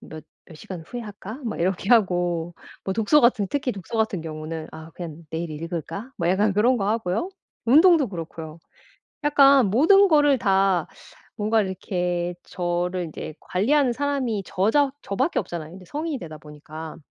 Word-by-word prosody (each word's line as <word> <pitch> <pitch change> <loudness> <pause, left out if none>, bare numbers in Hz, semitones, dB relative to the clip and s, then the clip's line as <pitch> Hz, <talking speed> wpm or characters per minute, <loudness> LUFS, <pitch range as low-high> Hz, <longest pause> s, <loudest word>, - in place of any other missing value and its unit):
몇 155 -1 -10 0.2
몇 160 - -13
시간 180 +3 -8
후에 245 +8 -6
할까?' 210 +1 -8
막 225 - -4
이렇게 185 +2 -1
하고 175 -6 +2 0.3
뭐 190 - -1
독서 225 +9 +4
같은 235 -5 +3
특히 275 +1 -1
독서 200 0 -6
같은 220 -5 0
경우는 155 0 -6
'아 160 +1 -10
그냥 170 -2 -8
내일 165 +1 -4
읽을까?' 165 - -5
뭐 170 - -1
약간 200 +3 +2
그런 230 +6 +3
거 200 -3 -1
하고요. 220 - -1 0.4
운동도 310 +2 +6
그렇고요. 165 -3 -7 0.7
약간 275 -4 +6
모든 330 - +5
거를 290 -3 +5
다 195 -5 +2 0.5
뭔가 215 +1 +2
이렇게 180 -2 -2
저를 175 0 -2
이제 155 0 -7
관리하는 255 +7 +2
사람이 260 -6 -1
저 190 +3 0
자 285 0 +3
저 200 - -5
밖에 270 - 0
없잖아요. 160 -3 -5
근데 185 +1 -12
성인이 300 - -3
되다 155 -5 -8
보니까 155 +1 -10
195 Hz, 330 characters per minute, -24 LUFS, 170-245 Hz, 0.7 s, 운동도